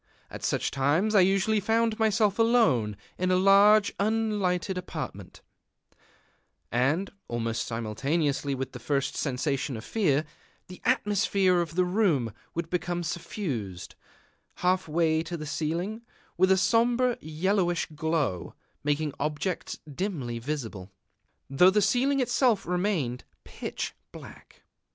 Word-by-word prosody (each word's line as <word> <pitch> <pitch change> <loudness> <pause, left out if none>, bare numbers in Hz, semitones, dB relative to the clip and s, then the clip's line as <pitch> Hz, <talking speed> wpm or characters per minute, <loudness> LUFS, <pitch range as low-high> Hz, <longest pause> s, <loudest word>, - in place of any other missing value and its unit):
At - - -8
such - - 0
times 150 +11 +1
I 205 - +6
usually 195 +3 +3
found 225 +2 +1
myself 215 -1 +2
alone 215 - +3 0.2
in 185 0 +1
a 185 - +3
large 200 +3 +5
unlighted 205 -4 0
apartment; 180 - -7 1.3
and, 140 +11 +1 0.2
almost 115 -1 -2
simultaneously 140 +6 -1
with 135 0 -4
the - - -8
first 140 -2 -1
sensation 135 -1 -2
of 110 - -9
fear, 155 -9 +1 0.4
the 180 - -11
atmosphere 200 -6 +2
of 165 -1 -5
the 180 0 +3
room 180 - +1 0.2
would 170 0 -2
become 175 -1 -1
suffused, 135 - -4 0.6
half 185 0 +1
way 160 0 +2
to 170 +1 -5
the 155 - -6
ceiling, 170 +9 -3 0.3
with 185 +2 +3
a 190 - +5
sombre 240 +4 +2
yellowish 175 +3 0
glow, 150 - -2 0.3
making 150 0 0
objects 150 +5 -2
dimly 140 - -3
visible, 115 -8 -5 0.6
though 140 +7 +5
the 205 +2 +3
ceiling 250 +7 +2
itself 250 -3 +2
remained 175 - -1 0.2
pitch - - -5 0.2
black. - - -13
175 Hz, 125 wpm, -27 LUFS, 145-205 Hz, 1.3 s, I